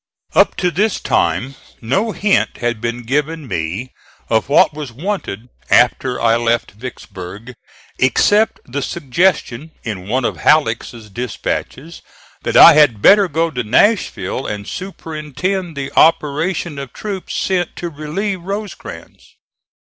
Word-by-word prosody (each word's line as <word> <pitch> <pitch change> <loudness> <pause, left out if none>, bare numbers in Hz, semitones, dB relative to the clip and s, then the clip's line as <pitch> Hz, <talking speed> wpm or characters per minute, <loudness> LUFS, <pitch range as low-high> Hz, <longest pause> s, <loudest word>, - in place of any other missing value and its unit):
Up - - +4
to 180 -1 0
this 205 +5 0
time 130 +2 0 0.3
no 195 - 0
hint 205 -1 +1
had 120 -2 -2
been 120 +1 -3
given 150 +4 -2
me 95 +6 -3 0.4
of 110 +3 +1
what 145 - +5
was 145 -4 -6
wanted 135 - -4 0.2
after 125 +1 +3
I 115 0 +3
left 120 0 0
Vicksburg, 105 -1 -9 0.5
except 205 - +3
the 140 +3 -4
suggestion 150 -1 0
in 100 -6 -5
one 125 +3 0
of - - -2
Halleck's 145 -7 +2
dispatches 120 - -5 0.4
that - - 0
I - - +10
had 140 -9 +4
better 200 -1 +7
go 165 +1 0
to 125 -3 -3
Nashville 160 - +1
and 105 0 -5
superintend 175 -1 -4
the 135 -1 -4
operation 155 0 +2
of 135 -3 -8
troops 200 -3 -5
sent 180 -2 -1
to 175 - -4
relieve 170 +6 -4
Rosecrans. 200 +3 -8
140 Hz, 130 wpm, -17 LUFS, 120-175 Hz, 0.5 s, I